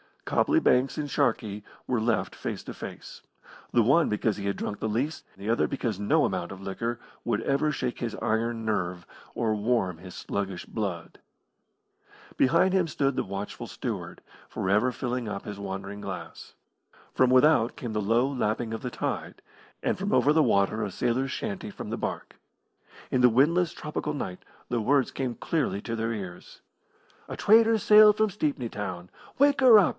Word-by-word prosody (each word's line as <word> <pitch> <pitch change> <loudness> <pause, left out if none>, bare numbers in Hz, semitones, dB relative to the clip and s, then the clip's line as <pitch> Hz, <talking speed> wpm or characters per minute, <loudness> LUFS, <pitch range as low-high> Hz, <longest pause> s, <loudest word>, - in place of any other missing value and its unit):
Copley 320 +1 +2
Banks 130 - +3
and 145 -1 -3
Sharkey 105 -5 0 0.2
were 125 -2 +1
left 110 -4 0
face - - -5
to - - -7
face, - - -9 0.5
the 120 - +5
one 140 +9 +4
because 105 0 0
he 100 - -5
had 100 - 0
drunk 105 - -4
the - - -2
least, 130 +8 -2
the 100 +3 -6
other 115 - +2
because 115 -7 -3
no 150 +10 +3
amount 90 -2 -2
of 95 - -11
liquor 115 +5 -3 0.3
would 115 -2 0
ever 140 +4 +1
shake 125 -3 -3
his 115 -2 -3
iron 115 +1 -1
nerve 90 -5 -2 0.3
or 110 -2 +1
warm 105 -5 0
his 90 +1 -11
sluggish 95 -2 -4
blood. 95 -7 -5 1.2
Behind 170 +7 +4
him 185 -3 +3
stood 140 -3 0
the - - 0
watchful 100 +1 -5
steward, - - -5 0.3
for 95 - -3
ever 105 +6 +3
filling 125 -1 -3
up 100 -2 -4
his 105 -1 -7
waning 100 +1 -5
glass. - - -8 0.6
From 130 - +4
without 130 -2 +4
came 120 - -5
the 105 - 0
low 115 +5 +2
lapping 115 -4 -1
of 110 - -4
the 125 - -3
tide, - - -4 0.4
and - - 0
from 200 +2 -1
over 145 - +4
the 160 - +4
water 100 0 +2
a 100 - -2
sailor's 130 +5 0
chanty 100 - -4
from - - -8
the - - -3
barque. - - -5 0.7
In 130 - +2
the 125 - +7
windless 165 +8 +3
tropical 150 -2 -4
night 90 -10 -5 0.2
the 120 -2 0
words 135 +3 +2
came 130 -3 -3
clearly 140 -11 -1
to 115 +1 -4
their 115 0 -1
ears: 95 -5 -8 0.7
A - - -5
trader 225 +1 +5
sailed 210 0 +7
from 215 0 +3
Stepney 145 - -2
Town, 90 -4 -5 0.3
Wake 285 +1 +4
her 250 -5 +8
up! 200 - +5
115 Hz, 180 wpm, -27 LUFS, 100-140 Hz, 1.2 s, her